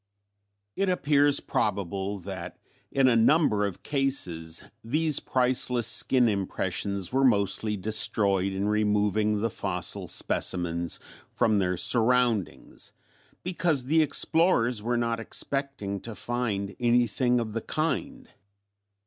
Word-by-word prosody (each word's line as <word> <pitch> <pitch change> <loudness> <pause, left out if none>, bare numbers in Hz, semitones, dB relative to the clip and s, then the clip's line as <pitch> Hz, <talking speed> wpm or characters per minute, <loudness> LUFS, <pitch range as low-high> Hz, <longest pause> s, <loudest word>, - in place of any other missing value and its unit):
It 195 -1 0
appears 145 -5 +3
probable 100 -1 -2
that 90 -2 -8 0.3
in 135 -1 +3
a 125 - +4
number 115 -4 +3
of 95 - -9
cases 90 - -1 0.2
these 150 +5 +1
priceless 125 -2 +1
skin 125 +2 +3
impressions 100 -1 -2
were 135 +1 +2
mostly 105 -2 +1
destroyed 100 -1 +1
in 95 +1 -2
removing 105 0 +1
the 115 - 0
fossil 90 -3 -2
specimens 85 -1 -1 0.3
from 110 -2 +1
their 90 -2 0
surroundings 120 -2 0 0.5
because 170 -7 0
the 160 +4 +3
explorers 145 - +2
were 120 +2 -1
not 115 -1 -1
expecting 120 -4 -3
to 115 +1 -9
find 105 -5 -3
anything 120 0 +2
of 110 -2 -4
the 115 - -3
kind. 260 - -3
115 Hz, 115 wpm, -27 LUFS, 100-130 Hz, 0.5 s, a